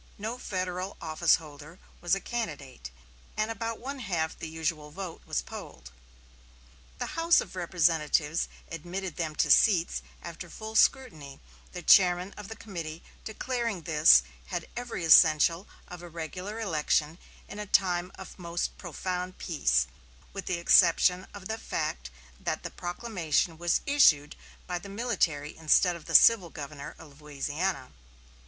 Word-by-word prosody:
No 220 +4 -5
Federal 185 -1 -4
office 160 +1 +3
holder 150 +1 -11 0.2
was 175 +2 +2
a - - -3
candidate, 145 - -5 0.5
and 215 +1 0
about 225 0 -4
one 275 +2 -6
half 170 -8 -2
the 160 - -7
usual 160 -1 -3
vote 180 +1 -7
was - - -1
polled. - - -10 1.1
The - - -4
House 335 +1 +4
of - - -5
Representatives 165 -3 +1 0.2
admitted 175 +2 -5
them 160 -3 -3
to - - +2
seats 185 -7 +4 0.2
after 170 +1 -8
full 220 +5 -8
scrutiny, 155 - +1 0.3
the 180 - -8
chairman 180 +1 +5
of 210 -2 -9
the 225 - -7
committee 170 -7 -7 0.2
declaring 230 -4 -3
this 150 - +6 0.2
"had - - -4
every 240 -8 -4
essential 165 +3 +6 0.2
of 180 -1 -9
a 175 - -10
regular 180 +6 -6
election 160 -4 0 0.3
in 210 - -9
a 210 - -5
time 180 -2 +2
of 190 - -11
most 170 0 -3
profound 180 +1 -4
peace, 65 - +1 0.5
with 195 - -7
the 180 - 0
exception 180 +1 +4
of 200 -2 -9
the 220 +1 -4
fact 60 - -3 0.3
that - - -3
the - - -5
proclamation 175 -4 -2
was 175 0 +1
issued 155 - +4 0.3
by 180 -1 -3
the 200 - -11
military 190 -10 -1
instead 160 +3 +3
of 170 - -11
the - - -3
civil 215 -7 +7
governor 145 -2 -8
of 150 -2 -15
Louisiana." 150 +2 -3
175 Hz, 145 wpm, -28 LUFS, 155-195 Hz, 1.1 s, civil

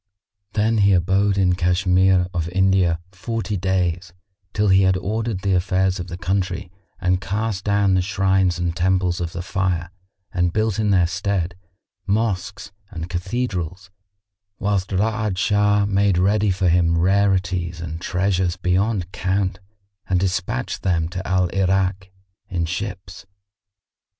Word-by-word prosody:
Then 110 +1 +1
he 100 -1 +5
abode 95 +3 +2
in 95 -2 +3
Cashmere 90 +1 +3
of 85 -2 -2
India 95 -2 +2
forty 110 +3 -4
days, 90 -2 -1 0.4
till 105 0 +1
he 95 0 +5
had 95 -1 +3
ordered 110 +1 -2
the 100 0 +1
affairs 95 +1 +1
of 90 - -5
the 90 -1 -6
country 95 -1 -2 0.3
and 90 0 +1
cast 100 0 -2
down 100 -1 +2
the 95 - +3
shrines 95 -1 +1
and 85 -1 -2
temples 90 0 +1
of 85 -1 -3
the 85 +1 -5
Fire 90 -2 -1 0.4
and 90 -1 +1
built 110 -1 0
in 105 -1 +1
their 95 -3 +4
stead 90 0 -1 0.5
mosques 100 -2 -1 0.2
and 85 -3 -7
cathedrals, 95 -2 -3 0.7
whilst 100 -2 -1
Ra'ad 105 0 0
Shah 105 +1 +2
made 100 -2 +2
ready 100 +3 +2
for 95 0 +1
him 85 -1 +3
rarities 90 -2 +1
and 80 0 -6
treasures 90 -1 0
beyond 95 +1 0
count 95 0 -1 0.5
and 90 -1 +2
despatched 90 -8 -2
them 85 -3 0
to 90 +1 -6
Al 95 0 +2
Irak 95 0 0 0.4
in 85 -4 -1
ships. 95 +2 -6
95 Hz, 140 wpm, -21 LUFS, 90-100 Hz, 0.7 s, he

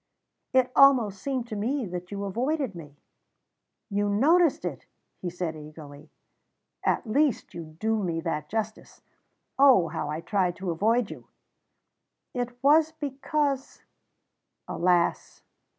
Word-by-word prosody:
"It 260 -1 +3
almost 240 -9 +5
seemed 260 -2 -2
to 215 - -4
me 245 +5 -1
that 180 -1 -6
you 200 0 -5
avoided 255 +4 -1
me." 150 -4 -11 0.9
"You 205 +1 0
noticed 310 - +3
it!" - - -5 0.3
he 180 - -4
said 175 -2 -4
eagerly. 150 -1 -11 0.7
"At - - +1
least, 275 -1 +1
you 160 -2 -9
do 220 0 0
me 170 -3 -1
that 155 -3 -3
justice. 220 0 -5 0.6
Oh, 255 -12 +6
how 155 -2 -4
I 155 +1 -3
tried 185 -2 0
to 185 -2 -3
avoid 220 +6 +1
you!" - - -11 1.1
"It 245 0 -4
was 310 +3 +5
because 280 -1 -2 0.4
" - - -55
"Alas!" 175 -1 0
210 Hz, 130 wpm, -27 LUFS, 175-270 Hz, 1.1 s, Oh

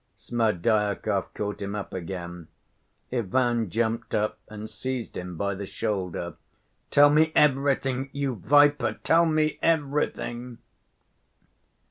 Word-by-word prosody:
Smerdyakov 105 -2 0
caught 105 -1 -4
him 100 +1 -3
up 105 - -5
again. 85 -2 -6 0.7
Ivan 120 -1 +1
jumped 115 +3 -1
up 105 0 -1
and 110 0 -8
seized 120 +2 -5
him 90 -1 -6
by 100 +2 -1
the 100 0 -6
shoulder. 90 -6 -3 0.5
"Tell 145 0 +6
me 160 +2 +4
everything, 135 -2 +2
you 140 -2 -2
viper! 145 -5 +4
Tell 165 +1 +4
me 155 -1 +1
everything!" 140 -6 -1
115 Hz, 110 wpm, -26 LUFS, 100-140 Hz, 0.7 s, Tell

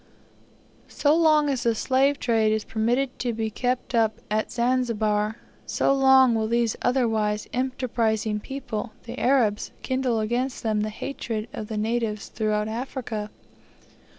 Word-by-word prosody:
So 295 +1 +2
long 310 -3 +4
as 270 -4 0
the 235 -1 +1
slave 270 +4 +2
trade 225 -3 +2
is 215 -1 0
permitted 245 +4 -1
to 245 -1 -1
be 220 -1 -2
kept 250 +3 -2
up 220 -2 +2
at 215 0 0
Zanzibar, 225 -3 0 0.3
so - - +2
long 265 -2 +6
will 220 -1 0
these 235 -1 +1
otherwise 220 -4 +1
enterprising 230 -4 0
people, 245 -3 -5
the 240 +2 -7
Arabs, 240 -6 +2
kindle 255 -4 0
gainst 250 +4 -2
them 215 -2 +1
the 215 - -1
hatred 220 -1 -4
of 215 - -5
the 220 - -4
natives 220 -1 -1
throughout 215 -1 -1
Africa. 225 -2 -4
230 Hz, 140 wpm, -25 LUFS, 215-255 Hz, 0.3 s, long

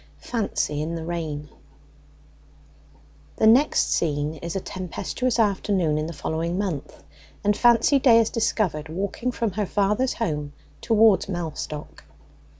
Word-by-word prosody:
FANCY 200 -10 -2
IN 165 +2 -3
THE 165 -1 -5
RAIN 155 -3 -4 1.9
The - - +1
next 250 +7 +4
scene 150 -1 0
is 170 +3 -6
a - - 0
tempestuous 190 +7 -3
afternoon 195 -7 +1
in 155 - -2
the - - -5
following 165 +3 -3
month, 185 -8 -4 0.4
and 205 0 +2
Fancy 240 +5 +4
Day 245 -4 +6
is 230 -1 +3
discovered 185 -9 -1
walking 200 +8 -3
from 230 -3 -2
her 205 +2 -2
father's 210 +7 +1
home 150 -8 -3 0.3
towards 220 -3 +4
Mellstock. 160 -4 -5
185 Hz, 130 wpm, -24 LUFS, 160-225 Hz, 1.9 s, Day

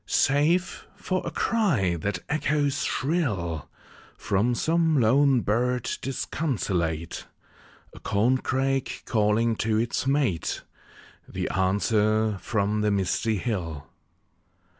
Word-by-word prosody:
Save 160 +6 +1
for 185 0 -2
a - - -3
cry 145 - +1
that 90 +1 -3
echoes 145 -2 0
shrill 110 - -1 0.5
From 105 +5 +1
some 160 +1 +2
lone 130 +2 +4
bird 125 +3 0
disconsolate; 95 - -2 0.7
A - - -12
corncrake 130 +4 0
calling 110 +1 +2
to 110 -1 0
its 120 +3 -1
mate; 135 - 0 0.7
The - - -3
answer 105 +2 +1
from 105 0 -1
the 105 - +2
misty 100 +2 0
hill. 85 - -4
115 Hz, 95 wpm, -26 LUFS, 100-135 Hz, 0.7 s, lone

